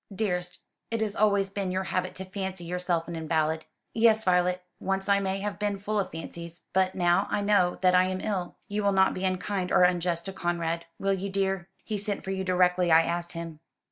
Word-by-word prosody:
"Dearest, 180 -3 -2 0.3
it 230 - -1
has 210 -2 -1
always 200 -2 +2
been 195 -2 -2
your 185 +1 -1
habit 185 -1 -2
to 190 - -4
fancy 190 -1 -4
yourself 175 -1 -1
an 170 - -5
invalid." 160 0 0 0.3
"Yes, 220 -1 +4
Violet, 180 -1 +2 0.2
once 195 0 -1
I 200 0 +4
may 195 0 -2
have 205 0 -4
been 205 -1 0
full 210 +2 -1
of 195 - -1
fancies: 170 +1 -8
but 190 0 +2
now 175 +2 +3
I - - 0
know 200 -3 +3
that 185 0 +5
I 180 0 +5
am 185 0 -2
ill. 185 -3 -3
You 205 +1 -2
will 200 -1 +2
not 190 0 +4
be 185 - -3
unkind 185 0 -1
or - - +5
unjust 175 -1 +2
to 195 - -5
Conrad, 170 -2 -2
will 195 0 +1
you, 195 +1 -3
dear? 195 -1 -1
He 210 -2 -3
sent 205 0 -2
for 190 - -4
you 190 0 -2
directly 180 -1 +3
I 160 +1 +7
asked 170 +1 -2
him. 165 -2 -6
185 Hz, 215 wpm, -28 LUFS, 175-195 Hz, 0.3 s, I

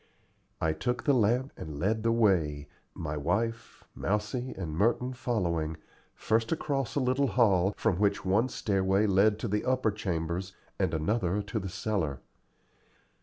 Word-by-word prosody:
I 80 -1 +1
took 125 +9 -2
the 145 - +3
lamp 125 +3 +2
and 75 -2 -7
led 110 +6 +1
the 115 +1 +2
way 85 -11 +2 0.3
my 75 -1 -4
wife, 110 +10 -2
Mousie, 105 +5 -2
and 85 -5 -4
Merton 120 +7 +1
following 85 -11 -1 0.4
first 115 +1 0
across 140 -5 -1
a - - +2
little 130 +2 +2
hall, 100 -5 +3
from 110 -6 +1
which 100 -1 +1
one 105 +7 +2
stairway 95 -1 +1
led 105 +1 +4
to 115 - -3
the 105 0 0
upper 130 -4 +1
chambers 90 -2 -3 0.3
and - - +1
another 100 +4 0
to 105 +2 -3
the 95 -1 -5
cellar. 90 - -2
105 Hz, 150 wpm, -29 LUFS, 90-115 Hz, 0.4 s, led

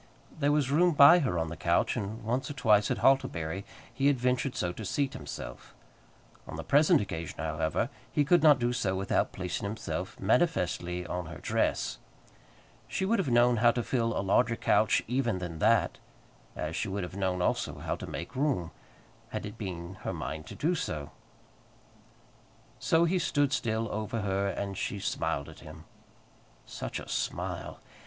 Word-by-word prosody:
There 145 -1 +3
was 145 -3 +1
room 175 +4 +4
by 145 +5 +9
her 110 - 0
on 80 -1 -1
the 85 - -6
couch, - - +1
and 105 +3 -4
once 125 +5 -1
or - - -4
twice, 105 -6 +3
at - - 0
Hartlebury, 95 -9 +1 0.3
he 135 - +1
had 145 -2 +4
ventured 125 +1 0
so 90 - -1
to 110 - -7
seat 135 +7 -1
himself. - - -8 0.7
On - - -7
the 80 - -5
present 150 - +4
occasion, 85 -5 -5
however, 80 +1 -1 0.2
he 145 - +2
could 175 +3 +4
not 150 -3 +7
do 120 0 0
so 100 -6 0
without 95 +1 0
placing 90 -2 -4
himself 100 -2 -4
manifestly 90 - +1
on 90 -2 -4
her 85 - -8
dress. - - -1 0.9
She 190 - -2
would 220 +2 +2
have 180 - 0
known 120 0 +4
how 120 +2 +5
to 120 0 0
fill 115 -2 0
a 95 - -1
larger 115 +4 +3
couch 110 -1 +3
even 120 -4 0
than 85 -3 -6
that, - - +3 0.6
as 80 +1 -4
she 110 - -1
would 100 0 -3
have 90 +1 -7
known, 95 -2 -1
also, 90 - 0
how - - -3
to - - -7
make 85 - -6
room, 130 - 0 0.6
had - - -4
it 105 - -7
been 95 -4 -6
her - - -3
mind 80 0 -5
to - - -8
do 165 +4 +1
so. 75 - -4 1.7
So 165 +1 +3
he 180 +2 +1
stood 145 -4 +1
still 115 -2 0
over 110 +1 -3
her, 100 0 0
and 100 0 -3
she 100 - -3
smiled 70 -6 -2
at - - -12
him. - - -11 0.8
Such - - -5
a - - -9
smile! - - -3
110 Hz, 175 wpm, -29 LUFS, 90-135 Hz, 1.7 s, by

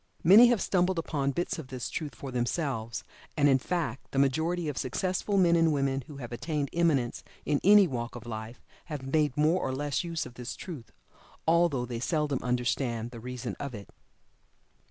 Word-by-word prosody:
Many 205 +8 +9
have 235 -4 +2
stumbled 185 -1 +1
upon 145 -4 -1
bits 170 +4 -2
of 150 - -7
this 130 -1 -5
truth 150 -2 -5
for 135 - -7
themselves, 120 -2 -2 0.3
and, 145 -1 +5
in 135 -2 +5
fact, 140 -5 -3
the - - -5
majority 160 +5 +1
of 145 - -2
successful 185 - -1
men 175 -3 +5
and 165 -1 +4
men 135 -2 0
who 145 - -10
have 120 -4 -7
attained 145 +3 -2
eminence 150 -8 +1 0.2
in 145 -1 +1
any 205 +1 +8
walk 120 -3 -4
of 120 - -9
life 110 +1 -7 0.2
have 150 -5 -6
made 150 -4 +2
more 155 +5 +3
or 130 - -1
less 145 +4 -1
use 165 -2 -3
of - - -10
this 125 -1 -6
truth, 150 -11 -8 0.6
although 165 -6 +3
they 120 -1 -5
seldom 150 0 0
understand 120 -1 -1
the 120 - -9
reason 125 +1 -5
of 140 -4 -5
it. 100 -1 -10
140 Hz, 185 wpm, -29 LUFS, 125-165 Hz, 0.6 s, Many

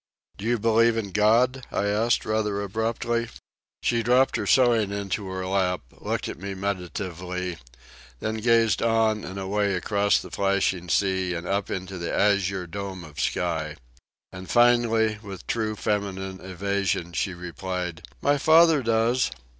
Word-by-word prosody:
"Do 100 - -8
you 120 +1 +2
believe 115 +1 +3
in 100 -3 -3
God?" 120 +6 +3
I - - 0
asked 110 +3 +1
rather 105 -2 0
abruptly. 115 +3 -1 0.5
She 115 -1 +2
dropped 125 +3 +3
her 100 - -2
sewing 120 -5 +4
into 100 0 -3
her 95 0 -4
lap, 95 -1 0
looked - - -4
at - - -7
me 100 +1 -5
meditatively, 90 -2 -4 0.6
then 110 - -2
gazed 115 0 +3
on 110 -2 +2
and 95 +2 -7
away 100 +1 0
across 100 +2 +2
the - - -10
flashing 95 -3 0
sea 95 -1 +1
and 85 +1 -5
up 100 +2 -1
into 95 0 -5
the 85 - -3
azure 100 -2 +1
dome 95 +1 -6
of 75 -3 -11
sky. 80 -3 -1 0.6
And 90 0 -9
finally, 115 -3 +3
with 100 -4 -9
true 110 -2 -1
feminine 95 -3 -2
evasion, 95 -2 -2
she 90 +4 -1
replied: 90 -1 -5 0.2
"My 145 0 +3
father 160 0 +6
does." 115 +2 +2
100 Hz, 145 wpm, -25 LUFS, 95-115 Hz, 0.6 s, father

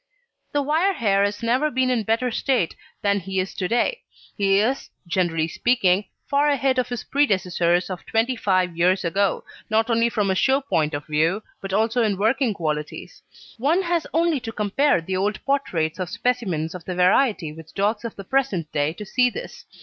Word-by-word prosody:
The 290 -1 0
wire 320 +7 +2
hair 200 - +2
has 205 +2 -2
never 255 +6 +2
been 255 -1 +1
in 245 -3 +1
better 225 +4 0
state 240 -7 0 0.3
than 200 0 +2
he 190 +1 -3
is 185 +1 -2
to 185 - -2
day; 240 - 0 0.3
he 195 -1 +2
is, 245 +7 0 0.2
generally 170 -3 0
speaking, 200 -1 +2 0.2
far 285 +1 +2
ahead 270 -2 +2
of 250 - -1
his 245 -1 -4
predecessors 180 -9 +1
of 185 -2 -6
twenty 230 +3 +1
five 185 -5 +1
years 180 +2 +2
ago, 195 +3 0 0.3
not 225 +2 +2
only 230 +1 +3
from 205 -4 0
a - - 0
show 265 +7 +3
point 155 - 0
of 145 - -5
view, 165 +7 +1 0.2
but 195 - -6
also 225 +4 +1
in 210 -4 +1
working 225 +2 +1
qualities. 155 - -4 0.4
One 320 +10 +2
has 340 -2 0
only 330 -2 +2
to 230 -2 -6
compare 215 - +1
the 185 +3 -3
old 205 +3 -1
portraits 185 - -1
of 180 -1 -3
specimens 185 -12 -1
of 180 -2 -8
the 180 - -4
variety 185 - +2
with 160 0 -13
dogs 210 +3 0
of 230 - -5
the 195 - -8
present 195 - -1
day 145 +1 0
to 210 +4 -8
see 250 +4 +2
this. - - -8
210 Hz, 190 wpm, -23 LUFS, 180-255 Hz, 0.4 s, only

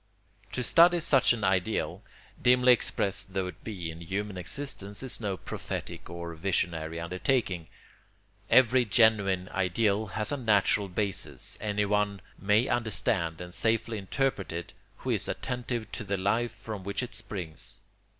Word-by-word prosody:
] - - -31
To 125 - -1
study 175 +5 +6
such 135 -5 +4
an 115 -3 -1
ideal, 95 +3 0 0.4
dimly 125 0 +6
expressed 100 -4 -1
though 95 -1 +1
it 90 - -8
be 90 -7 -4
in 80 +1 -10
human 100 +4 -3
existence, 100 +2 -5
is 130 -2 -3
no 100 -3 -1
prophetic - - -6
or 85 -1 -5
visionary 85 -2 -1
undertaking. 90 0 0 0.8
Every 130 0 +6
genuine 105 -5 +3
ideal 100 +3 +1
has 105 +2 -3
a 145 - 0
natural 105 -4 +3
basis; 100 +1 -3
anyone 105 -1 +1 0.2
may 105 +5 +3
understand 95 -7 0
and 90 0 -7
safely 110 +2 +1
interpret 105 +1 -1
it 85 0 -5 0.2
who - - -3
is - - 0
attentive 120 -3 -3
to 120 - -5
the 100 -1 -1
life 110 +4 0
from 105 -4 -7
which 100 +6 -2
it 120 - -6
springs. 95 -7 -6
105 Hz, 145 wpm, -29 LUFS, 90-115 Hz, 0.8 s, study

